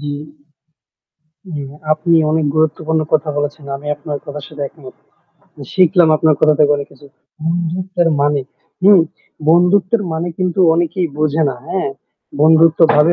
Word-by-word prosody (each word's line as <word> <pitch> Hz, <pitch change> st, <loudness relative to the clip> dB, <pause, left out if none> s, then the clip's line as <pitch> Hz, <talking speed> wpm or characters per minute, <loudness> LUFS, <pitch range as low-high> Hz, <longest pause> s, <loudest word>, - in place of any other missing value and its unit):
জি। 145 Hz, 0 st, -4 dB, 1.4 s
উম 145 Hz, -4 st, -6 dB, 0.2 s
আপনি 165 Hz, +2 st, +1 dB, 0.2 s
অনেক 160 Hz, -1 st, +1 dB
গুরুত্বপূর্ণ 160 Hz, 0 st, 0 dB
কথা 155 Hz, 0 st, +1 dB
বলেছেন। 145 Hz, 0 st, -4 dB
আমি 150 Hz, -, -11 dB
আপনার 145 Hz, 0 st, -6 dB
কথার 145 Hz, 0 st, -7 dB
সাথে 150 Hz, -2 st, -10 dB
একমত। 135 Hz, -3 st, -14 dB, 0.8 s
শিখলাম 180 Hz, -2 st, +4 dB
আপনার 155 Hz, 0 st, +3 dB
কথা 155 Hz, -1 st, +4 dB
থেকে 145 Hz, -1 st, +4 dB
অনেক 140 Hz, -1 st, -6 dB
কিছু। 145 Hz, -, -17 dB, 0.4 s
বন্ধুত্বের 175 Hz, +1 st, -1 dB
মানে 145 Hz, 0 st, +1 dB, 0.4 s
হু? 200 Hz, +2 st, +7 dB, 0.6 s
বন্ধুত্বের 185 Hz, +5 st, +3 dB
মানে 160 Hz, +2 st, -3 dB
কিন্তু 185 Hz, 0 st, -1 dB
অনেকেই 175 Hz, +1 st, 0 dB
বোঝে 155 Hz, +1 st, +1 dB
না। 135 Hz, -, -3 dB
হ্যাঁ? 185 Hz, -5 st, -2 dB, 0.5 s
বন্ধুত্বভাবে 160 Hz, 0 st, +5 dB
160 Hz, 135 wpm, -16 LUFS, 150-175 Hz, 1.4 s, হু